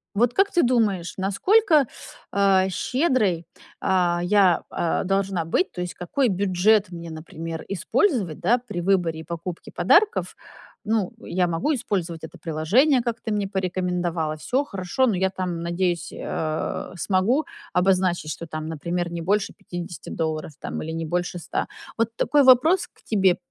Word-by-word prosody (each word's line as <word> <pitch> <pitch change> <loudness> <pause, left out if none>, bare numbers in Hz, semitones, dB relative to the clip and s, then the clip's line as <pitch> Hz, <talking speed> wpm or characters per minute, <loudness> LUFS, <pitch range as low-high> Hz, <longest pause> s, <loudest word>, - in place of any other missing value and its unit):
Вот 240 +3 +3
как 395 +1 +3
ты 350 - +3
думаешь, 215 -8 +1
насколько, 310 - +3 0.5
а, 195 -1 +3
щедрой, 230 - +1 0.3
а, 175 -2 +2
я, 190 -2 +4
а, 170 - -1
должна 195 -2 0
быть? 360 - 0
То - - -9
есть 180 0 -4
какой 205 +9 0
бюджет 200 +1 +2
мне, 170 -1 -7
например, 160 0 -7
использовать, 200 - 0
да, 240 - +3
при 210 -8 -6
выборе 175 -4 +1
и - - -9
покупке 170 +1 -6
подарков? 435 +2 +3 0.5
Ну, 220 -1 0
я 180 -5 0
могу 170 - 0
использовать 185 - -3
это 160 - -9
приложение, 205 - +2
как 235 -1 -3
ты 220 - -4
мне 205 -1 0
порекомендовала. 180 -4 -1
Всё, 255 - 0
хорошо, 195 +2 0
но 220 - +1
я 190 +1 +1
там, 185 -3 -3
надеюсь, 170 0 -1
э, 155 0 -3
смогу 205 - +1 0.3
обозначить, 180 -3 +1
что 170 +3 -6
там, 155 -1 -5
например, 170 +2 -3
не 170 -1 -4
больше 195 +4 0
50 175 -1 -8
долларов 155 -1 -3
там, - - -5
или 160 - -5
не 165 0 -3
больше 175 +2 -2
100. - - -3 0.3
Вот 230 -1 +1
такой 290 +3 +3
вопрос 280 +8 +5
к - - -29
тебе 195 -4 +3
185 Hz, 155 wpm, -24 LUFS, 170-220 Hz, 0.5 s, вопрос